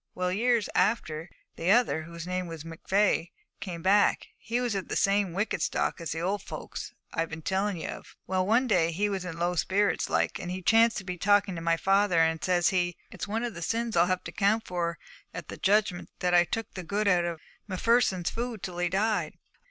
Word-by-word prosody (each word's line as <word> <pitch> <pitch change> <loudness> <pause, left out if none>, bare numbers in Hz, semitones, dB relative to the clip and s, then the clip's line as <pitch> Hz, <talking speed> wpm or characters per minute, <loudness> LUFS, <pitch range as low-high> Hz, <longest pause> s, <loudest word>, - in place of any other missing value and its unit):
Well, 180 0 -1
years 230 +2 +2
after, 165 -7 0 0.3
the 170 - -1
other, 225 -7 +4
whose 170 +1 -8
name 185 0 -2
was 165 -2 -7
McVey, 175 +2 0 0.3
came 175 -5 -6
back. 200 +2 +3
He 235 +2 -2
was 245 -3 -1
of 195 -2 -3
the - - -3
same 200 -2 +2
wicked 200 +6 -1
stock - - -1
as 165 -2 -4
the 160 - -3
old 195 +4 -1
folks - - -7 0.2
I've 165 0 -1
been 160 -1 -7
telling 190 +2 0
ye 160 - -5
of. - - -8
Well, 185 0 0
one 235 +5 +4
day, 175 -8 +2
he 205 +5 0
was 190 -2 -3
in 165 -2 -6
low 175 +1 0
spirits 195 +4 +1
like, - - 0
and 175 - -5
he 185 +1 -4
chanced 225 +3 +4
to 195 - -4
be 180 -2 -5
talking 205 0 +3
to 165 - -5
my 165 0 +2
father, 195 0 +2
and 160 -1 +2
says 180 -2 +3
he, 175 -2 0
"It's - - -6
one 225 +3 -2
of 240 -2 -3
the 170 - -8
sins 230 +4 -1
I'll 170 +1 +5
have 185 0 -1
to - - -7
'count 215 +2 +1
for 170 -2 -2 0.4
at - - -7
the - - -7
Judgment 200 -2 +1
that 180 0 0
I 175 0 +6
took 225 +4 -4
the 185 - -5
good 200 +5 -1
out 180 -3 +4
of 170 -2 -3 0.3
M'Pherson's 190 -2 +2
food 235 -3 -4
till 175 -1 -5
he 175 0 +1
died. 210 +4 0
185 Hz, 220 wpm, -28 LUFS, 175-205 Hz, 0.4 s, I